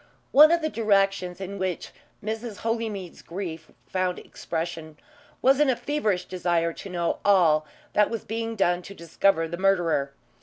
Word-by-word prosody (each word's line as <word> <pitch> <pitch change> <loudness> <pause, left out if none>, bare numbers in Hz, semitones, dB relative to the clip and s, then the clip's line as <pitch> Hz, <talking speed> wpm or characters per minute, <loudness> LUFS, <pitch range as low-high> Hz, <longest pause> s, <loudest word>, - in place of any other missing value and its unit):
One 305 +3 +8
of 340 -1 +2
the 315 - +1
directions 195 - +1
in 195 +1 -6
which 185 -2 -3 0.3
Mrs. 220 0 -5
Holymead's 220 -6 -3
grief 165 -3 -6 0.2
found 185 -1 -1
expression 165 -2 -5 0.5
was 270 +2 +5
in 295 -2 +4
a 255 - +3
feverish 225 -11 -1
desire 170 -2 0
to 195 - -9
know 170 -2 -1
all 165 -6 +4 0.3
that 210 - +4
was 230 -1 -4
being 225 0 -3
done 175 -3 +2
to 200 +2 -11
discover 170 0 +1
the 170 +1 -5
murderer. 175 -8 +2
190 Hz, 155 wpm, -26 LUFS, 170-220 Hz, 0.5 s, One